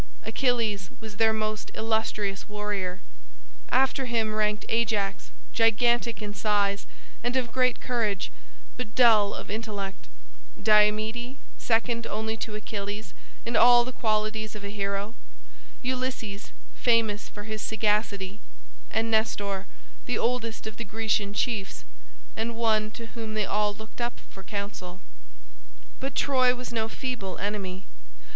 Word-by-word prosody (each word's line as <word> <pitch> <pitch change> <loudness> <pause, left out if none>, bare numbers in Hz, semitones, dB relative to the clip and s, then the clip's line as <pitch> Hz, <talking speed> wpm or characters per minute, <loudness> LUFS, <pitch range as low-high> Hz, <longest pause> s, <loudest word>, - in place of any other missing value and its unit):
Achilles 225 -8 +1
was 215 -2 -9
their 225 0 +5
most 215 0 -2
illustrious 220 -3 -1
warrior. 205 -3 -2 0.7
After 265 0 +3
him 225 -3 +1
ranked 210 0 +1
Ajax, 210 -3 +1 0.2
gigantic 230 -1 +3
in 205 -1 -4
size 205 0 +1 0.4
and 245 +1 0
of 250 -3 +1
great 250 0 +2
courage, 220 -6 0 0.5
but 225 -3 -5
dull 220 -5 +6
of - - -6
intellect; 205 -3 -4 0.5
Diomede, 215 +4 +3 0.2
second 235 0 +1
only 220 +1 -1
to 220 -1 -4
Achilles 205 0 -4 0.3
in 235 0 -2
all 240 +1 +8
the 255 - -4
qualities 215 -2 0
of 210 - -7
a 200 - -4
hero; 200 +1 -2 0.7
Ulysses, 250 -5 -2 0.2
famous 225 -4 +2
for 205 - -8
his 215 0 -4
sagacity; 210 -2 0 0.5
and 225 +1 0
Nestor, 200 -3 +1 0.4
the 245 - +1
oldest 230 -2 0
of 220 -1 -6
the 235 - -3
Grecian 210 -1 0
chiefs, 210 -4 -1 0.5
and 230 +1 -2
one 220 -2 +2
to 230 +1 -8
whom 225 -2 -5
they 215 -1 +2
all 210 +1 +2
looked 220 +3 -9
up 240 0 -2
for 190 - -10
counsel. 190 -2 -5 1.0
But 270 +1 -3
Troy 255 -2 +4
was 250 -1 -6
no 225 -1 0
feeble 240 -7 -3
enemy. 195 -2 -3
215 Hz, 130 wpm, -28 LUFS, 205-235 Hz, 1.0 s, all